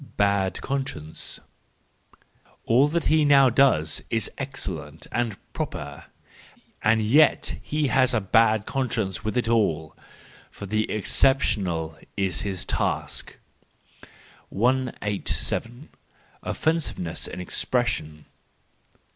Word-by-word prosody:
Bad 100 -1 +1
Conscience 135 - -4 1.3
.—All 125 +5 +4
that 165 +3 -1
he 155 0 +3
now 140 -3 +6
does 110 - +3
is 115 -1 +1
ex¬ 135 0 -5
cellent 80 - -5
and 115 -5 -1 0.2
proper—and 105 +8 -4
yet 145 +8 +3
he 150 -2 -1
has 130 0 +3
a - - +3
bad 110 +1 +3
con¬ 130 -4 -2
science 95 +4 -2
with 110 +3 -2
it 120 - 0
all. 80 -10 +1 0.5
For 100 - -9
the 110 +2 -1
exceptional 95 - +1 0.2
is 95 -4 0
his 95 -3 -3
task. - - -2 1.1
187. 120 +2 -1 0.5
Offensiveness 155 - -1
in - - -7
Expression 90 -6 -1
110 Hz, 100 wpm, -25 LUFS, 95-130 Hz, 1.3 s, now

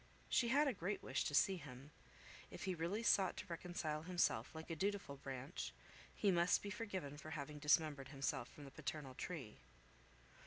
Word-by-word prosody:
She 240 - +4
had 285 +5 +5
a 270 - +3
great 195 +1 -2
wish - - 0
to 145 - 0
see 190 +5 +5
him. 140 -2 -9 0.6
If - - -7
he 190 0 +1
really 175 +7 -1
sought 195 -4 +4
to - - -4
reconcile 165 -3 -2
himself 165 -9 +2
like 160 +1 -6
a - - 0
dutiful 195 -5 -1
branch, 135 +3 -4 0.4
he 200 - +4
must 175 0 +4
be 200 - -3
forgiven 185 -10 -4
for 155 - -7
having 150 -1 -4
dismembered 150 -2 +3
himself 135 -3 -1
from 145 - -11
the 135 - -9
paternal 140 -1 -4
tree. 135 -5 -5
160 Hz, 180 wpm, -41 LUFS, 140-190 Hz, 0.6 s, had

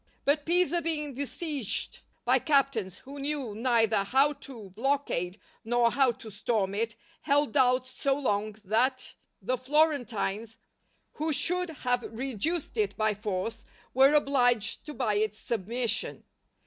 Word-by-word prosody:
But 290 +1 +2
Pisa 345 -1 +3
being 300 -3 -2
besieged 285 - -3 0.3
by - - +4
captains 275 - +1
who 280 +2 -10
knew 280 -5 -2
neither 225 -1 +2
how 270 +8 +3 0.2
to 220 -7 -10
blockade 225 -6 -1 0.2
nor 235 0 +3
how 265 -1 +4
to 220 -1 -11
storm 200 -1 0
it, 225 +2 -1 0.3
held 290 +1 +2
out 255 -1 +4
so 270 +1 0
long, 215 -6 -1
that 250 +6 +1 0.3
the 255 +5 -1
Florentines, 250 -7 0 0.5
who 315 +1 -2
should 360 +4 0
have 250 -5 -1 0.2
reduced 275 - -2
it 420 - 0
by 215 -1 +2
force, 210 +1 -3 0.3
were 270 +3 +6
obliged 245 -7 +2
to 300 - -6
buy 215 -6 +1
its 215 0 0
submission. 230 +2 -3
255 Hz, 135 wpm, -29 LUFS, 220-285 Hz, 0.5 s, were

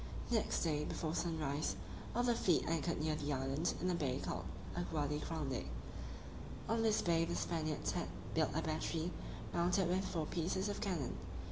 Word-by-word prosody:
Next 225 -2 +2
day, 150 -3 +2
before 155 +1 -1
sunrise, 155 - 0 0.4
all 245 - +3
the 245 -1 +5
fleet 180 -7 +3
anchored 165 0 +1
near 155 0 +2
the 145 -1 -1
island, 135 +5 +1
in 185 +1 +2
a - - +2
bay 135 -6 +1
called 95 - -2 0.3
Aguade 150 -4 0
Grande. 145 - -1 1.0
On 225 0 +2
this 220 -1 +4
bay 165 -1 +4
the 170 +1 0
Spaniards 155 -3 0
had - - -1 0.3
built - - +4
a - - +2
battery, 160 +2 0 0.4
mounted 180 +2 +3
with 185 +2 +2
four 165 -5 -1
pieces 180 +5 0
of 205 - -2
cannon. 175 - 0
165 Hz, 165 wpm, -38 LUFS, 150-180 Hz, 1.0 s, the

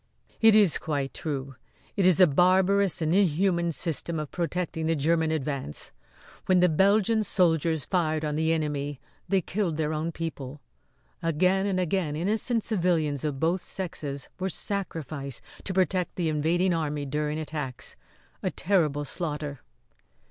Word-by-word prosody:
"It 225 -1 +7
is 205 -6 +5
quite 140 -3 -2
true. 140 -3 -4 0.4
It 195 -3 +3
is 185 -2 +5
a 185 - +9
barbarous 185 +3 +3
and 160 +1 +1
inhuman 175 -2 +2
system 165 +1 -2
of 150 -2 -5
protecting 170 -2 -2
the 165 - +2
German 160 +2 +2
advance. 140 - -3 0.6
When 185 -1 +5
the 180 0 +5
Belgian 200 +6 +3
soldiers 165 -6 +2
fired 160 -4 0
on 150 -1 -1
the 160 +1 +1
enemy 145 -3 -2 0.3
they 195 0 +3
killed 180 -3 -2
their 155 -1 0
own 155 +2 -2
people. 150 -4 -6 0.6
Again 185 +4 +2
and 190 -2 0
again 180 -4 0
innocent 215 +7 0
civilians 170 - 0
of 145 -3 -2
both 170 +4 +1
sexes 150 -7 -5
were 190 +1 -1
sacrificed 155 - -4 0.2
to - - -2
protect 185 -1 0
the 170 -3 0
invading 170 +4 +1
army 150 -3 -2
during 150 +2 -2
attacks. 150 -5 -5 0.5
A - - 0
terrible 155 -7 +1
slaughter!" 150 -3 -4
165 Hz, 145 wpm, -27 LUFS, 150-185 Hz, 0.6 s, a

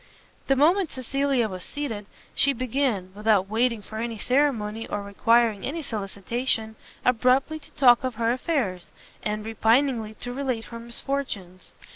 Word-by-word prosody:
The 270 - +4
moment 335 +6 +4
Cecilia 270 -1 0
was 185 -3 -6
seated, 230 -9 -5 0.3
she 280 - +3
began, 250 -6 -1
without 210 -2 +2
waiting 225 +1 +1
for 220 +2 -7
any 230 -1 -3
ceremony, 225 -4 0
or 205 - -3
requiring 225 +1 +2
any 320 +4 -3
solicitation, 220 +1 -2 0.3
abruptly 255 +5 +3
to 285 - -17
talk 250 -4 +6
of 255 -2 -2
her 230 +1 +1
affairs, 245 - -1 0.3
and 210 0 -3
repiningly 225 0 +2
to 245 0 -5
relate 255 -4 -2
her 230 - -5
misfortunes. 235 -6 -4
235 Hz, 140 wpm, -25 LUFS, 215-270 Hz, 0.3 s, talk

